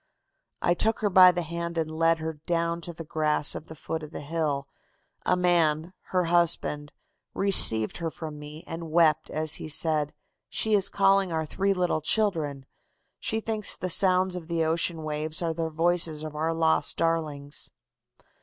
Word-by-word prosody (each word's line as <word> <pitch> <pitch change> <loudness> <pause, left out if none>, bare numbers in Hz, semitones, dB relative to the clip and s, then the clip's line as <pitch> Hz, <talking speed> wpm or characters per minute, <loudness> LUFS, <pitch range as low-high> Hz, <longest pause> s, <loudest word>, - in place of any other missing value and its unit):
"I 175 - +3
took 220 +6 0
her 205 -2 +1
by 185 -1 +8
the 175 -1 -3
hand 170 +1 -5
and 160 -1 -1
led 165 +1 +2
her 160 0 -4
down 170 +2 -2
to 170 - -7
the 165 0 -9
grass 155 -1 +1
at 155 - -8
the 160 - -10
foot 160 +2 -5
of 155 - -8
the - - -8
hill. 145 -2 -2 0.6
A 180 - +4
man 170 -2 +1
her 185 -1 0
husband 165 -3 0 0.4
received 115 - +3
her 165 -1 -3
from 155 -2 -8
me 150 +2 -10
and 165 0 -7
wept 160 -1 +3
as 155 0 +2
he - - -5
said: 155 -1 +2 0.4
'She 220 - -1
is 200 -2 +3
calling 195 -2 +2
our 160 -1 -1
three 195 +5 0
little 180 -3 0
children. 155 -8 0 0.5
She 220 - -1
thinks 220 -2 -1
the 185 - -3
sounds 185 0 +3
of 170 -3 -7
the 165 -1 0
ocean 165 0 0
waves 155 +2 -2
are 165 -1 -1
the 165 0 -3
voices 165 -1 +1
of 155 -1 -7
our 160 +2 -1
lost 160 -2 +1
darlings. 150 -4 -1
165 Hz, 175 wpm, -26 LUFS, 155-175 Hz, 0.6 s, by